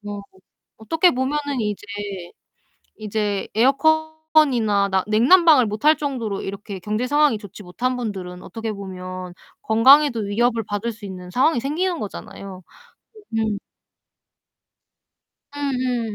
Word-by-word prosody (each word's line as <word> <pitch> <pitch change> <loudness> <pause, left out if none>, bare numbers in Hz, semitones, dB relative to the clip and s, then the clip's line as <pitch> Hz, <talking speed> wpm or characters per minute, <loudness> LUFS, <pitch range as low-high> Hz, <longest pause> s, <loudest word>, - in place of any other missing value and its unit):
뭐 205 -1 -7 0.5
어떻게 325 +11 +2
보면은 280 +1 -2
이제 210 -1 -3 1.1
이제 210 -2 -2
에어컨이나 280 -5 +2
나 190 -1 +1
냉난방을 260 +5 +5
못 210 +3 -5
할 310 -1 +6
정도로 245 -9 -3
이렇게 200 0 -6
경제 215 +6 -2
상황이 290 -4 +3
좋지 205 0 -11
못한 250 +8 -2
분들은 185 -6 -6
어떻게 225 +4 -5
보면 185 -2 -7 0.3
건강에도 255 +3 +5
위협을 225 +3 0
받을 205 +3 -3
수 210 -2 -11
있는 180 -2 -8
상황이 255 - +2
생기는 335 +6 -1
거잖아요. 195 -2 -8 0.8
예 - - +2
음. 215 -2 -1 2.0
음음. 255 -5 -2
225 Hz, 270 characters per minute, -22 LUFS, 205-275 Hz, 2.0 s, 할